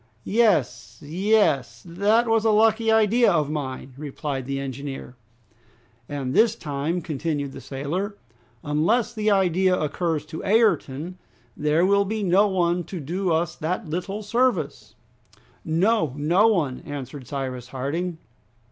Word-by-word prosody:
"Yes, 190 - +1
yes! 155 - +1
That 205 +7 +2
was 225 -1 +2
a 225 - +3
lucky 220 +1 +3
idea 220 +1 +4
of 150 -4 +1
mine!" 135 -3 -5
replied 140 -2 -5
the 135 0 -2
engineer. 135 -1 -6 0.9
"And 135 -3 -3
this 225 +5 +4
time," 150 +4 -3
continued 150 -2 -3
the - - -9
sailor, 175 +10 -4 0.5
"unless 170 +12 +1
the 215 -2 0
idea 185 -2 +3
occurs 155 0 -1
to 160 +1 -7
Ayrton, 180 - +1 0.4
there 150 +4 +2
will 200 +1 +3
be 215 +1 -2
no 195 +3 +4
one 175 -2 +1
to 185 - -6
do 175 +5 -2
us 170 +1 0
that 180 +4 -3
little 195 +5 -3
service!" 215 - -1 0.7
"No! 170 - +1
No 175 +9 +3
one!" 155 - +1
answered 140 -2 -8
Cyrus 130 -3 -4
Harding. 155 +7 -3
170 Hz, 130 wpm, -24 LUFS, 145-205 Hz, 0.9 s, idea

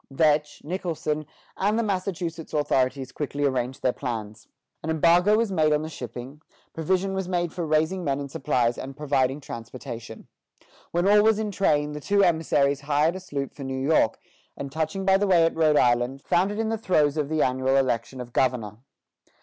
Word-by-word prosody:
" - - -53 0.2
Vetch, 150 -1 +1
Nicholson, 155 -3 -3 0.3
and 205 +3 +1
the 230 - +1
Massachusetts 180 -6 -3
authorities 130 -2 0
quickly 145 -1 -2
arranged 130 -1 -1
their 125 - +2
plans. 110 -4 -6 0.3
An 160 - -5
embargo 170 +6 +4
was 225 -2 0
laid 155 -4 +2
on 150 0 +2
the 160 - -5
shipping; 125 +1 -8 0.3
provision 185 +4 0
was 190 -1 -3
made 175 -3 -1
for 175 -3 -3
raising 155 +4 +1
men 140 -3 -1
and 140 -1 -6
supplies 125 -4 0
and 135 +1 -7
providing 140 -2 0
transportation. 115 -3 -8 0.6
When 175 +2 0
all 210 +1 +6
was 220 0 +4
in 215 -1 -2
train, 150 -7 +1
the 150 - -5
two 200 +5 +2
emissaries 145 -5 +2
hired 150 +4 +1
a - - -4
sloop 140 -7 -5
for 140 - -9
New 135 0 -4
York, 135 -4 +2 0.4
and 140 -1 -6
touching 160 +5 -2
by 190 0 +5
the 205 +1 0
way 175 -3 +5
at 165 - 0
Rhode 155 -2 +3
Island, 120 +2 +2
found 180 +3 +2
it 205 - -5
in 225 0 -1
the 225 -1 -2
throes 155 -8 +2
of 150 -2 -1
the 155 -1 +2
annual 130 +1 +1
election 130 -1 0
of 120 -1 -8
governor. 115 -5 0
150 Hz, 190 wpm, -25 LUFS, 130-180 Hz, 0.6 s, all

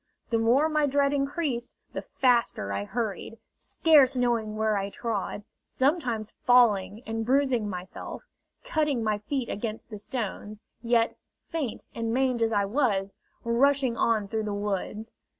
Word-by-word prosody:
The 230 - +2
more 245 +7 +4
my 305 -2 +2
dread 280 0 +2
increased, 275 -3 -1 0.2
the - - -3
faster 235 - +1
I 100 +1 -2
hurried, 225 - -4 0.2
scarce 290 -5 +4
knowing 235 -4 0
where 215 0 +1
I 200 0 -1
trod, 210 -2 -3 0.2
sometimes 255 -7 -1
falling 225 -3 +4
and 225 0 -2
bruising 255 -3 +2
myself, 180 - -7 0.4
cutting 300 - 0
my 215 -1 0
feet 250 +3 -3
against 220 +1 -5
the 210 - -6
stones, 215 -2 -5 0.2
yet, 235 -1 +2 0.3
faint 300 -9 -3
and 230 0 -2
maimed 255 -1 +1
as 225 0 +2
I 205 -2 +2
was, 200 -4 0 0.3
rushing 260 +1 +2
on 220 -3 +1
through 220 +1 -2
the 205 -1 -2
woods. 210 +2 -3
230 Hz, 145 wpm, -27 LUFS, 210-265 Hz, 0.4 s, more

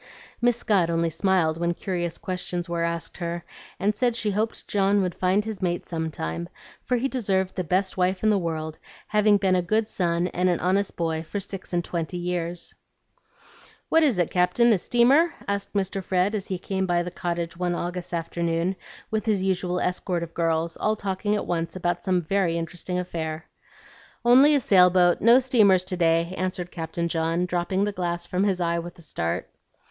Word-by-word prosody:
Miss 240 -1 +3
Scott 200 -8 +2
only 165 0 +1
smiled 165 -2 +1
when 170 0 0
curious 175 -3 -3
questions 180 -1 -4
were 170 -1 -2
asked 170 -1 -3
her, 170 0 -4 0.4
and 205 +2 +2
said 240 +1 +1
she 215 -3 0
hoped 215 +3 -2
John 200 0 +2
would 180 -1 -2
find 190 +3 +1
his 220 -3 -5
mate 175 -1 -1
some 160 -1 -3
time, 85 - -4 0.3
for 250 - 0
he 255 +3 0
deserved 195 -8 0
the 185 - -2
best 185 +4 0
wife 185 +2 +1
in 215 - +4
the 205 - +3
world, 160 -2 -4 0.3
having 210 -1 +4
been 190 -1 +1
a 180 - +2
good 215 +5 +1
son 170 -4 0
and 180 +1 +1
an 175 - +1
honest 190 +2 0
boy 160 -2 -1
for 165 +5 -5
six 195 -1 -7
and 175 -1 0
twenty 170 +1 -3
years. 175 -1 -3 1.2
"What 325 - +5
is 275 - +3
it, 175 -2 +1
Captain, 225 +6 +4
a 195 - +1
steamer?" 270 - +3
asked 200 0 -2
Mr. 195 -1 -1
Fred, 185 +3 +1
as 205 -2 -3
he 190 - -2
came 190 +1 -2
by 175 -1 +2
the 180 - -6
cottage 170 -1 -3
one 175 0 -1
August 175 +1 -4
afternoon, 170 +1 -1 0.4
with 220 0 -2
his 205 -4 +2
usual 180 -1 0
escort 180 -1 -1
of 165 -1 -8
girls, 165 0 0
all 215 0 +1
talking 200 +1 -1
at 210 - -2
once 165 0 -2
about 175 -1 -1
some 185 -2 +1
very 175 -1 +1
interesting 175 +2 -4
affair. 160 -3 -4 0.8
"Only 265 +5 +7
a - - +4
sail 185 -7 +6
boat; 180 -1 +3
no 235 +2 +7
steamers 220 -8 +4
to 185 0 -4
day," 170 0 +2
answered 180 -1 -3
Captain 165 0 -3
John, 165 +1 0
dropping 180 +2 0
the 205 - 0
glass 175 -3 -3
from 185 +2 0
his 190 -3 +1
eye 170 -1 0
with 175 +1 -8
a 170 - -13
start. 85 - -3
180 Hz, 195 wpm, -25 LUFS, 170-200 Hz, 1.2 s, Only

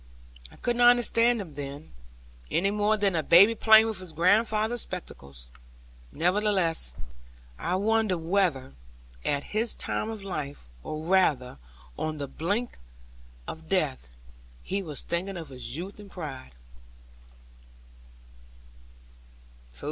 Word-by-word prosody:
I - - -15
could 240 - -1
not 240 0 +7
understand 240 -1 +3
him 175 -7 -7
then; 140 +1 -8 0.6
any 195 +3 +1
more 210 +1 +2
than 200 -3 +1
a 160 - +2
baby 180 +9 +7
playing 220 0 +6
with 220 -4 -2
his 185 -3 -8
grandfather's 215 +6 +2
spectacles; 70 - -9 0.6
nevertheless 180 - +1 0.6
I 180 - -1
wondered 215 -1 +1
whether, 165 - 0 0.5
at 145 -1 0
his 220 +2 +1
time 215 - -3
of 220 -3 -6
life, 150 - -5 0.2
or 155 0 -5
rather 150 - +2 0.4
on 155 0 -2
the 140 -1 -4
brink 200 - -3 0.7
of 160 0 -8
death, 150 - -1 0.5
he 195 +1 -2
was 155 -6 -6
thinking 180 +2 -3
of 165 -4 -7
his 130 +2 -6
youth 190 +5 -7
and 205 -1 -11
pride. 140 - -8
185 Hz, 120 wpm, -27 LUFS, 155-210 Hz, 0.7 s, not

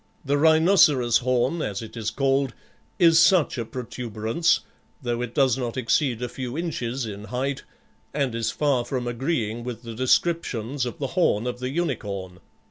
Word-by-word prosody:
The 140 +1 +1
rhinoceros 160 - +5
horn, 130 +6 0
as 100 -3 -3
it 110 - -10
is 110 -2 -2
called, 135 -2 0 0.4
is 165 -2 +6
such 170 -7 +4
a 115 - -2
protuberance, 120 +5 -1 0.4
though 120 -4 -2
it 120 -1 -5
does 135 -2 +3
not 120 -2 -3
exceed 125 0 +1
a - - -1
few 125 +2 -6
inches 135 -7 -3
in 105 -1 -7
height, 130 +4 -2 0.5
and 140 -4 -1
is 115 -1 -1
far 140 -5 +1
from 125 -1 -3
agreeing 120 -2 -2
with 120 -1 -6
the 115 -1 -7
descriptions 130 -1 0
of 120 - -6
the 135 -2 -3
horn 145 - +2
of 125 0 -3
the 125 0 -3
unicorn. 105 - -3
125 Hz, 165 wpm, -24 LUFS, 115-145 Hz, 0.5 s, is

